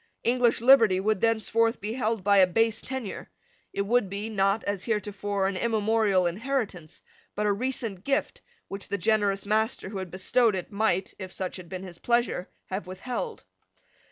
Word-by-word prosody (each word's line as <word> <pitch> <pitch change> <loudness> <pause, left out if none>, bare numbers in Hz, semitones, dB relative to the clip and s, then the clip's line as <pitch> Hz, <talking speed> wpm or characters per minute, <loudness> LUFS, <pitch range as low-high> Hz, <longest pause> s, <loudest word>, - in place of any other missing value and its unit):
English 240 -1 +3
liberty 230 -7 +6
would 210 0 0
thenceforth 230 0 +2
be 215 +1 -4
held 225 -4 -1
by 200 +1 +4
a 190 -1 +7
base 225 +3 +1
tenure. 260 -6 -6 0.4
It 200 - -1
would 225 -1 +1
be, 205 +3 -4
not, 195 +1 +1
as 200 -2 -3
heretofore, 205 -2 -1
an 195 0 0
immemorial 215 -3 +2
inheritance, 200 - -3 0.3
but 210 - -1
a 205 - +3
recent 225 -4 -3
gift 280 +4 -1 0.3
which 195 0 -6
the 200 - -1
generous 200 0 +1
master 215 -1 0
who 200 -1 -5
had 185 -1 -5
bestowed 210 +5 +2
it 185 +2 -5
might, 200 -3 0
if 190 -1 -7
such 190 0 -4
had 180 -2 -11
been 185 0 -6
his 175 -3 -10
pleasure, 235 -6 0 0.2
have 190 0 -3
withheld. 245 - -5
205 Hz, 170 wpm, -27 LUFS, 190-230 Hz, 0.4 s, a